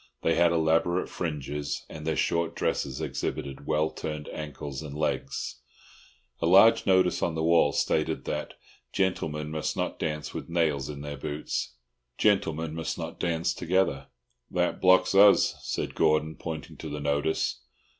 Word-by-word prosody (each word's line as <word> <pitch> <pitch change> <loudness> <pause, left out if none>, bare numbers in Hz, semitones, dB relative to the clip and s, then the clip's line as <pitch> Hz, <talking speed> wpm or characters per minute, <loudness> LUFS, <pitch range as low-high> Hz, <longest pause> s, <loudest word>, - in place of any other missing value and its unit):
They 80 - +3
had 85 0 +4
elaborate 85 +2 +2
fringes, 75 -3 -4
and 75 0 -8
their 80 - +1
short 85 +5 0
dresses - - -1
exhibited 70 -1 -4
well 75 0 +1
turned 75 -1 -5
ankles 75 -2 -6
and 75 -2 -7
legs. 70 -4 -2 0.8
A - - +2
large 100 +7 +6
notice 95 -1 +3
on 85 - 0
the 80 - -1
wall 80 -3 +4
stated - - 0
that - - -4 0.4
"Gentlemen 75 -5 -1
must 80 -1 -2
not - - -2
dance 75 -1 -3
with - - -6
nails 75 -5 0
in 70 -1 -6
their 70 0 -6
boots. 75 -2 -4 0.4
Gentlemen 80 -6 +1
must 80 0 -3
not - - -6
dance 85 -1 0
together." 95 +3 0 0.4
"That 90 0 0
blocks 95 +1 +5
us," 100 +1 +6
said - - -3
Gordon, 75 0 +2
pointing 80 -2 -7
to - - -7
the 75 - -4
notice. 70 -3 0
80 Hz, 150 wpm, -28 LUFS, 75-85 Hz, 0.8 s, large